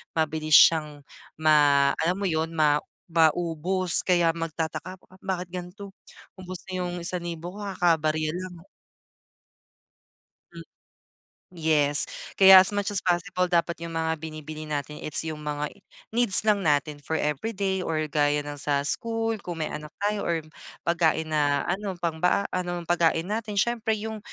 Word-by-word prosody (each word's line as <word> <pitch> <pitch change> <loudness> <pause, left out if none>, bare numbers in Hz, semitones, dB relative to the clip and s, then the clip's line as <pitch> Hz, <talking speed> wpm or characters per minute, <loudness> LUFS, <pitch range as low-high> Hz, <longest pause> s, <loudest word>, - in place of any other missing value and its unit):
mabilis 155 -1 +1
siyang 150 -3 +4 0.3
ma 145 -3 +4
alam 170 +3 0
mo 200 - -6
yun, 165 -3 -2
ma 150 -2 +3 0.3
maubos 170 +2 +1
kaya 175 -2 +3
magtataka 165 +2 -5
po, - - -22
"Bakit 185 -2 -5
ganto, 185 +3 -8 0.5
ubos 185 -1 -9
na 185 - -3
'yong 175 -1 -4
1,000 175 +1 -5
kakabarya 160 -6 0
lang." 180 0 -8 1.9
Hmm. - - -11 0.9
Yes. 150 -3 +3 0.3
Kaya 190 -1 +9
as 190 +2 +6
much 205 0 -1
as 205 - +1
possible 180 +1 -1
dapat 170 -1 0
yung 165 - -8
mga 160 0 -1
binibili 155 0 -8
natin 150 0 -5
is 155 - -8
yung 160 -1 -5
mga 150 0 -4 0.4
needs 235 -4 +8
lang 205 -5 +1
natin 145 0 0
for 145 +2 -5
everyday 190 +6 -2
or 160 -4 -2
gaya 145 0 +1
ng 145 0 -8
sa 140 0 0
school 225 +7 0
kung 170 -4 -6
may - - -3
anak 150 0 -8
tayo 205 0 -1
or 165 -2 -1 0.4
pagkain 160 -2 0
na 145 -2 +1
ano 195 +1 -3
pang 165 -2 -2
ba 180 +4 +2
ano 175 -1 -3
pagkain 170 +1 0
natin 215 -1 -3
siyempre 225 +2 0
yung 220 +1 -6
170 Hz, 145 wpm, -25 LUFS, 155-185 Hz, 1.9 s, Kaya